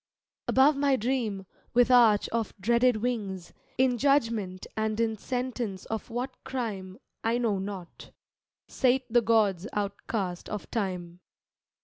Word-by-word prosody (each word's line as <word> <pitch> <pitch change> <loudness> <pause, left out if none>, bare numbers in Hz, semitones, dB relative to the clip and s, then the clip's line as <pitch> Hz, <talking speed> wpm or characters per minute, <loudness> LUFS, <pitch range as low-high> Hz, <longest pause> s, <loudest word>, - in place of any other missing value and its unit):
Above 280 +3 +5
my 280 -1 +3
dream, 225 -5 -1 0.3
with 245 +1 +5
arch 230 -4 +6
of 230 -2 -2
dreaded 235 +4 +3
wings, 200 -8 -3 0.2
In 250 -2 +2
judgement 230 -9 +1
and 220 0 -1
in 225 -1 +1
sentence 245 -4 -3
of 220 +2 -4
what 245 +3 -5
crime 210 -8 -4 0.3
I 230 +1 +2
know 225 -5 0
not, 190 -3 -7 0.6
sate 260 0 +2
the 240 - +6
gods 215 -4 +2
outcast 200 -2 -3
of 210 -2 -6
time. 180 -5 -3
225 Hz, 125 wpm, -28 LUFS, 195-250 Hz, 0.6 s, arch